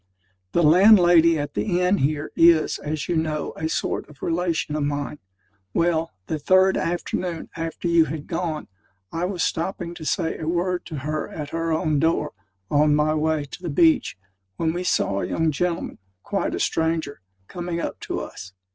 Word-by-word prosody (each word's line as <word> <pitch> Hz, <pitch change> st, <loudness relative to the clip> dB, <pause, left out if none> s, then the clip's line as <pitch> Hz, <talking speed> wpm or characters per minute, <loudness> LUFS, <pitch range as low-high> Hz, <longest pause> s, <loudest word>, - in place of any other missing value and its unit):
The 170 Hz, -, +3 dB
landlady 175 Hz, -1 st, +6 dB
at 145 Hz, -1 st, -4 dB
the 180 Hz, -4 st, 0 dB
inn 180 Hz, +2 st, +2 dB
here, 145 Hz, +2 st, -1 dB
is, 165 Hz, -2 st, +4 dB
as 150 Hz, -1 st, -4 dB
you 175 Hz, -, 0 dB
know, 155 Hz, -2 st, -1 dB
a 160 Hz, +1 st, -3 dB
sort -, -, -2 dB
of 150 Hz, -, -15 dB
relation 165 Hz, -3 st, -1 dB
of 150 Hz, -, -1 dB
mine. 145 Hz, 0 st, -3 dB, 0.6 s
Well, 165 Hz, -1 st, +1 dB, 0.2 s
the 155 Hz, -, -3 dB
third 185 Hz, +5 st, +4 dB
afternoon 175 Hz, 0 st, -2 dB
after 165 Hz, +1 st, -4 dB
you 170 Hz, -1 st, +5 dB
had 155 Hz, -1 st, -5 dB
gone, 165 Hz, -3 st, -3 dB, 0.4 s
I 165 Hz, +2 st, -1 dB
was 185 Hz, -1 st, -2 dB
stopping 170 Hz, 0 st, -2 dB
to 175 Hz, -, -9 dB
say 165 Hz, +1 st, -1 dB
a 155 Hz, -, -5 dB
word 175 Hz, +2 st, -1 dB
to 160 Hz, -, -6 dB
her 155 Hz, 0 st, -2 dB
at 150 Hz, -2 st, -7 dB
her 165 Hz, 0 st, -1 dB
own 155 Hz, -2 st, +1 dB
door, 160 Hz, +2 st, +1 dB, 0.4 s
on 150 Hz, 0 st, +4 dB
my 150 Hz, +1 st, +2 dB
way 155 Hz, -1 st, 0 dB
to 145 Hz, -, -10 dB
the 175 Hz, -, -4 dB
beach, 160 Hz, -, +3 dB, 0.4 s
when 160 Hz, -1 st, 0 dB
we 175 Hz, +1 st, -3 dB
saw 100 Hz, -, +1 dB
a -, -, -2 dB
young 160 Hz, -1 st, +1 dB
gentleman, 170 Hz, +3 st, -2 dB, 0.2 s
quite -, -, -1 dB
a -, -, -4 dB
stranger, 160 Hz, -4 st, -1 dB, 0.3 s
coming 175 Hz, -1 st, -4 dB
up -, -, -4 dB
to -, -, -4 dB
us. 95 Hz, 0 st, -9 dB
165 Hz, 180 wpm, -23 LUFS, 155-175 Hz, 0.6 s, landlady